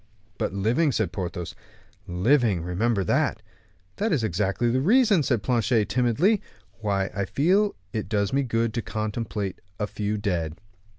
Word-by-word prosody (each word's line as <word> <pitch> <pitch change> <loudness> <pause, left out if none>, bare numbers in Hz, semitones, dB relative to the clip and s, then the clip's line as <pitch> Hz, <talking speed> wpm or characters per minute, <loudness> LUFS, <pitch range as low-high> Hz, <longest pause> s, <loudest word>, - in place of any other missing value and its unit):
"But - - 0
living," 115 - +2
said 110 -7 0
Porthos; 90 -1 -4 0.5
"living, 100 - +2
remember 100 +4 0
that." - - 0 0.5
"That 220 +1 0
is 140 -8 +1
exactly 105 +4 0
the 130 +2 +1
reason," 215 - +4
said 120 -7 0
Planchet, 115 -3 +1
timidly, 135 - +2 0.4
"why 100 -3 -1
I 100 0 -1
feel 195 - +2 0.2
it 110 -3 -3
does 100 -1 0
me 140 - +3
good 115 -3 0
to 120 - -1
contemplate 105 -3 -3 0.2
a 105 - +1
few 105 +1 -2
dead." 85 -6 -2
110 Hz, 145 wpm, -25 LUFS, 100-130 Hz, 0.5 s, reason